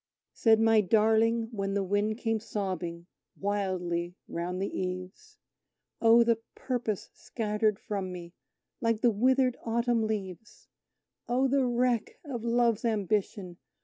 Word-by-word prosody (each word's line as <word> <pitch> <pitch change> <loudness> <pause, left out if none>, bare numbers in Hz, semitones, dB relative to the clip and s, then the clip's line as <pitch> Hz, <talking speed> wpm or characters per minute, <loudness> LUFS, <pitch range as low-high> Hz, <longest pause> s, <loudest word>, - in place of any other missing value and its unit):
Said 225 -2 +4
my 225 -1 +5
darling, 225 +3 +3
when 195 -3 -2
the 200 - +1
wind 205 +3 0
came 225 -2 -1
sobbing 185 -6 -4 0.3
wildly 180 -4 -2
round 175 +2 -4
the 195 - -3
eaves: 185 - -6 0.6
"Oh, 230 +1 +7
the 230 -1 +2 0.2
Purpose 240 -6 -3
scattered 210 -2 -1
from 195 -4 -4
me, 175 -1 -8 0.5
like 230 -2 +1
the 240 - +4
withered 255 +3 +2
autumn 235 0 +1
leaves! 200 -1 -6 0.6
Oh, 255 +2 +2
the 265 -1 +2
wreck 240 -2 0
of 245 -6 -5
Love's 235 -2 +2
ambition! 200 -4 -1
215 Hz, 125 wpm, -29 LUFS, 190-235 Hz, 0.6 s, Oh